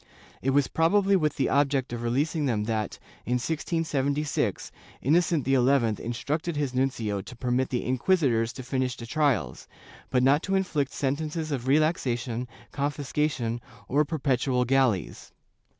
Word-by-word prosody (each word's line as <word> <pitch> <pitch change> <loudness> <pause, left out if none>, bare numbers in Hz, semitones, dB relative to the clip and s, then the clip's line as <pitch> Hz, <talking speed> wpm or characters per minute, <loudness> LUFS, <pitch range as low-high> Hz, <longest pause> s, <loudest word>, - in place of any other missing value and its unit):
It 135 - 0
was 140 0 +3
probably 195 +4 +3
with 155 -5 +1
the 135 - +1
object 140 -3 +1
of 120 - -4
releasing 145 +6 0
them 110 -4 0
that, 110 -1 -2 0.3
in 125 - -2
1676, 150 +1 -1 0.3
Innocent 160 0 +2
XI 135 - +2 0.5
instructed 150 +8 -2
his 145 -3 -1
nuncio 115 -6 -1
to 125 - -11
permit 125 +2 0
the 125 - -2
inquisitors 125 -4 +2
to 130 - -7
finish 130 -1 -1
the 115 - -7
trials, 115 - 0 0.4
but 125 -1 +2
not 140 +4 +4
to 195 - -1
inflict 155 -8 0
sentences 155 +3 -2
of 130 -4 -2
relaxa 145 -3 +2
tion, 120 0 -4 0.2
confiscation, 140 -4 -1 0.3
or 145 +3 +3
perpetual 135 -4 0
galleys. 130 -7 0
135 Hz, 140 wpm, -27 LUFS, 125-150 Hz, 0.5 s, not